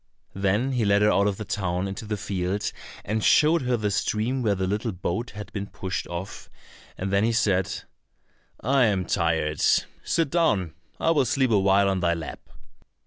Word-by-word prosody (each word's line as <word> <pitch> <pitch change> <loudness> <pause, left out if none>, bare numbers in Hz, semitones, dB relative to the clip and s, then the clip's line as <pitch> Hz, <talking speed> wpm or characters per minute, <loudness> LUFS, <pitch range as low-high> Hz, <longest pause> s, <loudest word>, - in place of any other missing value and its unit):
Then 100 +7 0
he 125 -3 0
led 100 0 +3
her 105 - +5
out 100 +1 +3
of 100 -2 -1
the 110 - -6
town 90 -2 -2
into 95 +4 -6
the 105 0 -3
field, 95 +1 -2 0.3
and 110 +2 -1
showed 155 +2 +5
her 125 -1 0
the 105 -2 -1
stream 110 +6 0
where 105 -4 +1
the 95 0 -1
little 105 +4 -1
boat 95 +5 -3
had 105 - -8
been 100 -1 -4
pushed 95 -2 -4
off, 85 +3 -7 0.5
and 95 +1 -3
then 100 +1 +3
he 115 - +2
said, 95 -5 0 0.8
"I 135 -1 +3
am 100 -4 +1
tired; 80 -3 0
sit 165 -4 +1
down, 105 - +1 0.3
I 165 - +2
will 145 -5 +3
sleep 130 +1 +1
awhile 100 -1 +4
on 95 -1 +1
thy 85 -1 +1
lap." 80 -2 -8
100 Hz, 185 wpm, -25 LUFS, 95-115 Hz, 0.8 s, her